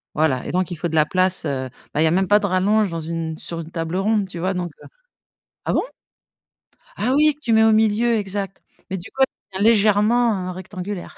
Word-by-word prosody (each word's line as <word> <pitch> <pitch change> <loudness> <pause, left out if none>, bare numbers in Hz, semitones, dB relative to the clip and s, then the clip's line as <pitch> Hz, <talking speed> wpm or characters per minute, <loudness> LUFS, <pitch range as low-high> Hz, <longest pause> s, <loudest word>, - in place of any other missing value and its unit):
Voilà, 150 -5 +1
et - - -3
donc 185 0 0
il - - -3
faut 170 - -2
de 160 - -4
la 155 - +5
place, 185 +2 +1
heu, 130 -2 -2 0.2
bah 150 - -1
il 160 - +4
y - - +4
a - - +2
même 190 +2 +1
pas 205 0 +6
de 205 - -2
rallonge 200 +2 +2
dans 165 -1 -4
une 165 0 -4
sur 165 +1 -6
une 165 - -7
table 165 +1 -3
ronde, 210 +1 +1
tu 170 - -7
vois? 185 +2 0
Donc 175 -2 -3
heu, - - -12 0.8
ah - - 0
bon? - - +2 1.1
Ah 255 - +1
oui, 300 +1 +4
que - - -32
tu 235 - -1
mets 220 0 +5
au 220 -1 +5
milieu, 220 +2 +3
exact, 195 -1 -4 0.3
mais 190 - -2
du 175 - -10
coup, 270 - -4 0.3
elle 190 - -5
devient 215 - +5
légèrement 210 -2 +2
rectangulaire. 185 +1 -7
190 Hz, 235 wpm, -21 LUFS, 170-210 Hz, 1.1 s, pas